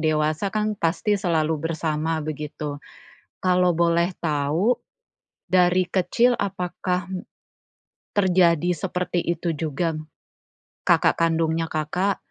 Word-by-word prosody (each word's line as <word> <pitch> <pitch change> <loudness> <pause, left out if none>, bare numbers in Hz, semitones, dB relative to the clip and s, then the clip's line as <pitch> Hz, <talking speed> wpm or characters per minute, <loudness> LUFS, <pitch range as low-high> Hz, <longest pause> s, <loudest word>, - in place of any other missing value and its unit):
dewasa 155 +4 +1
kan 215 +1 -1
pasti 200 +2 0
selalu 160 -3 +1
bersama 160 0 -1
begitu. 150 -1 -5 0.6
Kalau 180 -1 +3
boleh 170 +2 +2
tahu, 160 +10 +1 0.6
dari 180 0 +3
kecil 230 +7 +2
apakah, 185 -1 -2
hmm, 185 - -3 1.0
terjadi 180 -4 +3
seperti 180 +1 -2
itu 170 0 -1
juga? 155 0 -2 0.8
Kakak - - +3
kandungnya 165 0 +1
Kakak, 180 +6 -1
170 Hz, 100 wpm, -24 LUFS, 155-185 Hz, 1.0 s, Kalau